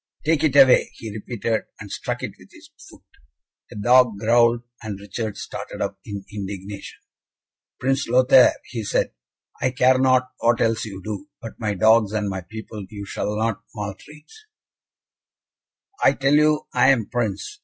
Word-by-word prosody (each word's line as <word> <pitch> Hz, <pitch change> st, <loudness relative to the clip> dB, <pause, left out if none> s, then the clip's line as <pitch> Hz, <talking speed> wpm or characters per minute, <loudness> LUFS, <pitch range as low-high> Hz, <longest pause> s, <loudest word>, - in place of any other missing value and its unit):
"Take 160 Hz, -1 st, +2 dB
it 145 Hz, -3 st, +2 dB
away," 135 Hz, -2 st, +6 dB
he 110 Hz, -, -8 dB
repeated, 110 Hz, +1 st, -3 dB
and 100 Hz, -1 st, -9 dB
struck -, -, -4 dB
it -, -, -3 dB
with -, -, -18 dB
his -, -, -17 dB, 0.2 s
foot. -, -, -17 dB, 0.7 s
The -, -, -12 dB
dog 120 Hz, +1 st, +4 dB
growled, 115 Hz, +2 st, +3 dB, 0.2 s
and 105 Hz, -3 st, -6 dB
Richard 105 Hz, +1 st, -5 dB
started -, -, -7 dB
up -, -, -3 dB
in 100 Hz, -2 st, -7 dB
indignation. 100 Hz, 0 st, -7 dB, 0.8 s
"Prince 135 Hz, +1 st, 0 dB
Lothaire," 130 Hz, +1 st, +6 dB
he 115 Hz, -3 st, -6 dB
said, -, -, -1 dB, 0.5 s
"I 130 Hz, -, +2 dB
care 130 Hz, +1 st, +3 dB
not 130 Hz, -1 st, +3 dB
what 120 Hz, 0 st, +2 dB
else 115 Hz, -1 st, +1 dB
you 95 Hz, -3 st, -8 dB
do, 105 Hz, +8 st, -6 dB
but 115 Hz, -, -10 dB
my 105 Hz, -3 st, -1 dB
dogs 110 Hz, +1 st, +4 dB
and 105 Hz, -1 st, -1 dB
my 95 Hz, -1 st, -4 dB
people 110 Hz, +2 st, -9 dB
you 100 Hz, -1 st, -8 dB
shall 105 Hz, +2 st, -3 dB
not 110 Hz, 0 st, -1 dB
maltreat." 105 Hz, +9 st, -8 dB, 1.8 s
"I -, -, +6 dB
tell 135 Hz, +1 st, +1 dB
you 150 Hz, 0 st, +3 dB
I 125 Hz, +2 st, +4 dB
am 120 Hz, -6 st, +3 dB
Prince! 120 Hz, -, -3 dB
115 Hz, 160 wpm, -22 LUFS, 105-130 Hz, 1.8 s, away